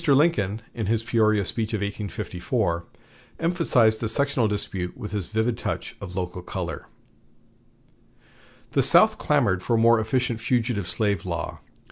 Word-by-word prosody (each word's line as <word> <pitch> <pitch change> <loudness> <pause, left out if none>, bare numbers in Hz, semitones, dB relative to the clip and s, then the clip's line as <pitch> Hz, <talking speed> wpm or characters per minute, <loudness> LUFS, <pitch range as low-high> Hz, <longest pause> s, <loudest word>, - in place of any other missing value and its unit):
Lincoln, 135 - +3
in 110 -4 -3
his 115 +1 +1
Peoria 110 -3 +2
speech 110 +3 -1
in 105 - -3
1854, 100 -3 -2 0.5
emphasized 150 -10 +3
the 115 - -1
sectional 140 -1 +1
dispute 95 -3 -2
with 105 - -6
this 100 -5 -3
vivid 110 +2 -1
touch - - -4
of 90 -2 -7
local 90 -1 -3
color: 90 -4 -5 1.8
"The - - +3
South - - +5
clamored 95 -1 +2
for 115 - 0
a - - +3
more 115 0 +5
efficient 120 +1 0
fugitive 115 -5 0
slave 100 -5 0
law. - - -4
110 Hz, 140 wpm, -25 LUFS, 100-115 Hz, 1.8 s, South